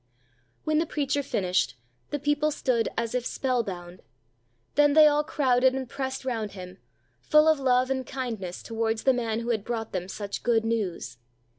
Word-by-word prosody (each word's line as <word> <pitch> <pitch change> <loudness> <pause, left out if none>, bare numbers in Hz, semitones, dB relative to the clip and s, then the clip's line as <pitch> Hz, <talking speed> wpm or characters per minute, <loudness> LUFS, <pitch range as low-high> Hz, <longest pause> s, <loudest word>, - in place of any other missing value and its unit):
'" 120 -1 -41
When 310 0 +2
the 330 - 0
preacher 285 -1 0
finished, 185 -9 0 0.3
the 290 - -2
people 295 +1 +1
stood 250 -6 0
as 230 0 -1
if 250 -1 0
spell 255 0 0
bound, 180 -4 -8 0.7
then 290 0 +4
they 310 0 +8
all 295 0 +4
crowded 260 -3 +2
and 265 -1 -3
pressed 265 +1 -4
round 225 -5 -2
him, 185 -1 -9 0.4
full 305 +1 +4
of 315 -2 +4
love 255 -1 +2
and 260 -1 -1
kindness 225 -10 -5
towards 225 -1 -2
the 265 - +4
man 230 -2 -1
who 235 - -4
had 220 -4 -1
brought 225 -1 -4
them 185 -1 -3
such 200 +1 -5
good 225 -2 +2
news. 185 - -2
245 Hz, 180 wpm, -27 LUFS, 210-275 Hz, 0.7 s, they